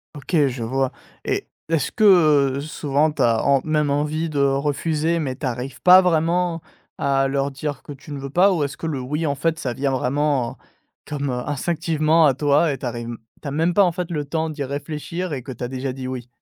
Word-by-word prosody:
Ok, 145 +4 -4
je 125 -2 -4
vois 130 +3 0 0.3
et - - -2 0.2
est-ce 165 -6 0
que 155 -10 +4
souvent 150 0 0
tu - - -4
as 115 -1 +3
en 140 -1 +4
même 150 -2 +1
envie 150 +3 0
de 150 -3 -3
refuser, 150 +4 +1
mais 135 -5 -2
tu 140 - -6
arrives 125 +2 -4
pas 185 +1 +9
vraiment 170 0 +1 0.4
à 135 -1 +1
leur 140 +1 -1
dire 145 +1 -5
que - - -10
tu 145 +2 -13
ne 145 - -4
veux 135 0 -6
pas? 185 +6 +5
Ou 170 -5 +1
est-ce 140 -1 -3
que 165 - -5
le 150 -4 -2
«oui», 150 +5 -2
en 140 - 0
fait, 160 +3 -1
ça 125 -5 -2
vient 135 +3 -1
vraiment 135 -1 0 0.5
comme, 145 -1 -3
heu, 125 -1 -3
instinctivement 160 +1 +2
à 140 - +4
toi 145 +3 +2
et 135 - -7
tu - - -6
arrives 120 0 -5 0.3
tu - - -7
as - - -3
même 165 +4 +1
pas, 205 - +6
en 180 - +3
fait, 180 -1 -4
le 150 -3 -2
temps 160 +2 -2
d'y 150 -2 -4
réfléchir 150 +5 -4
et 135 -4 -4
que 130 - -7
tu 125 - -8
as 125 - -1
déjà 130 0 -3
dit: 130 0 -6
«Oui»? 125 -2 -5
145 Hz, 225 wpm, -22 LUFS, 135-160 Hz, 0.5 s, pas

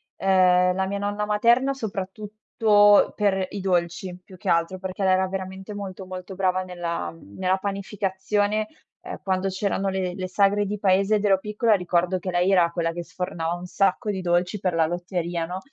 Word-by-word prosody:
Ehm, 180 -1 +4
la 190 +1 0
mia 200 +1 -3
nonna 205 +1 -2
materna, 235 +6 +3
soprattutto 210 -1 +2
per 195 -3 +1
i 205 - -6
dolci, 180 -1 -1
più 185 - -14
che 185 - -10
altro, 170 +1 +1
perché 190 +1 -4
lei 190 - +4
era 190 0 +2
veramente 190 +1 -6
molto, 195 -2 -7
molto 185 +1 -8
brava 185 -1 +1
nella 170 - -4
mhmm, 85 +4 -15
nella 185 0 +1
panificazione. 200 +2 -1 0.3
Ehm, - - -7
quando 190 0 0
c'erano 195 0 -1
le 190 -2 -2
le 185 -1 -4
sagre 200 +2 +2
di 205 +1 -4
paese 195 +1 +3
ed 210 0 0
ero 195 -2 +5
piccola, 210 +3 +1
ricordo 180 -1 +1
che 185 +1 -4
lei 175 +2 +2
era 175 -3 +4
quella 165 -1 -1
che 175 +1 -5
sfornava 170 -1 -4
un 175 +1 -8
sacco 195 +4 0
di 195 -2 -2
dolci 175 +3 0
per 185 -2 -1
la 165 -1 +3
lotteria, 175 0 -3
no. 180 +2 -5
190 Hz, 185 wpm, -24 LUFS, 180-205 Hz, 0.3 s, ero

